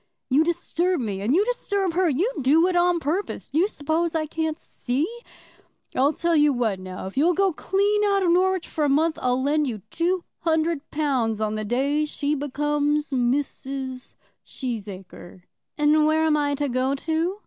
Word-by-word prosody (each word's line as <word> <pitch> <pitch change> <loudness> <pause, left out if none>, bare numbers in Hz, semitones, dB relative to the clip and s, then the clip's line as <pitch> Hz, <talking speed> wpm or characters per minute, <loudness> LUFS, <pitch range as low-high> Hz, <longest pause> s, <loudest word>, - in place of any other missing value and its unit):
"You 285 +4 +5
disturb 345 +1 0
me, 205 -5 -3
and 230 +8 +1
you 400 +4 +3
disturb 405 -7 -1
her. 360 0 +2
You 340 - +1
do 300 +6 +4
it 365 -1 0
on 350 0 +3
purpose. 335 +7 -3
Do 300 - 0
you 370 - +4
suppose 325 -1 -1
I 315 -1 0
can't 320 0 -2
see? 270 0 -2 0.9
I'll 275 +3 +3
tell 340 +1 0
you 295 -1 +5
what, 230 -7 -1
now; 185 0 -7
if 190 +6 -8
you'll 335 +5 +3
go 390 -2 +2
clean 405 +5 +1
out 395 -1 +2
of 350 - +3
Norwich 370 0 +2
for 310 - -2
a 290 - +2
month, 310 +3 +2
I'll 250 +1 +1
lend 295 +1 +1
you 215 -6 -5
two 350 +2 0 0.2
hundred 320 -2 0
pounds 255 -8 0
on 215 -1 -1
the 215 0 -3
day 275 +7 0
she 295 -1 -2
becomes 295 +1 -1
Mrs. 265 0 -2 0.3
Cheesacre." 195 -7 -7 0.3
"And 300 0 +4
where 315 +1 +2
am 310 -1 +3
I 290 -1 +1
to 290 +1 -1
go 260 +2 0
to?" 330 +6 -1
300 Hz, 180 wpm, -24 LUFS, 260-340 Hz, 0.9 s, You